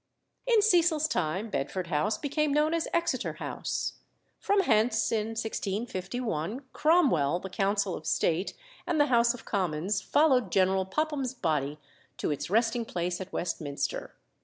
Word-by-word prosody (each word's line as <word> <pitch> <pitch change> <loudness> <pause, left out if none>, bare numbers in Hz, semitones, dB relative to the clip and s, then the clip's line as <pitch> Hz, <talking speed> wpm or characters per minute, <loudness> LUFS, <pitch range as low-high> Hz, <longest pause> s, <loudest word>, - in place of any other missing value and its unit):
In 460 -4 +4
Cecil's 335 -6 +4
time 190 - -1
Bedford 180 +7 -2
House 170 +7 0
became 295 +1 0
known 300 +2 +2
as 335 -1 0
Exeter 340 -1 0
House. - - -4 0.4
From 405 0 +2
hence, 220 - +2
in 215 -1 0
1651, 220 - -3
Cromwell, 260 - +3
the 190 0 -8
Council 195 0 0
of 155 - -6
State, 170 +3 0 0.3
and 340 -3 +1
the 290 - +6
House 235 +1 +4
of 240 - -13
Commons 190 +1 -1
followed 260 - +3
General 190 0 +3
Popham's 275 +2 -1
body 150 - -1 0.4
to - - -1
its 145 - -3
resting 230 +3 +2
place 175 -3 -3
at 190 - -7
Westminster. 155 -5 -3
215 Hz, 140 wpm, -29 LUFS, 180-290 Hz, 0.4 s, the